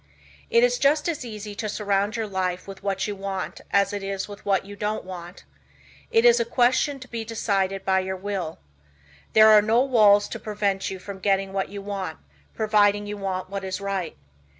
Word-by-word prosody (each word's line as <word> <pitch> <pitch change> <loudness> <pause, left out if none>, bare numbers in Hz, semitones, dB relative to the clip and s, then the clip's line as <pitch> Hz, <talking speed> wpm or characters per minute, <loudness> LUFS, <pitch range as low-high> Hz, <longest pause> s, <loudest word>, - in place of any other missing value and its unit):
It 465 0 +4
is - - +3
just 295 +3 +3
as 325 -6 -2
easy 215 -3 -7
to 215 +1 -4
surround 205 0 0
your 225 -1 -1
life 185 -3 -2
with 195 -1 -9
what 195 0 -1
you 205 - -3
want 195 -1 -5
as 200 0 +2
it 205 - -3
is 195 0 -3
with 205 -1 -11
what 195 -1 +1
you 205 +1 -9
don't 210 0 -3
want. 175 -1 -9 0.7
It 225 +1 +3
is 240 0 +7
a - - +3
question 255 +4 +2
to 255 - -9
be 230 -2 -5
decided 195 -4 -1
by 190 0 +3
your 190 0 -3
will. 190 -4 -4 0.8
There 220 0 +8
are 215 -1 +8
no 225 +4 +3
walls 210 -6 +5
to - - -5
prevent 205 -2 -1
you 190 - -5
from 195 +1 -9
getting 195 0 0
what 195 -1 -1
you 200 0 -7
want, 195 -5 -4 0.4
providing 205 -1 +3
you 205 0 -5
want 185 -1 -4
what 200 -1 -4
is 190 0 -3
right. 195 - -3
200 Hz, 200 wpm, -24 LUFS, 195-220 Hz, 0.8 s, There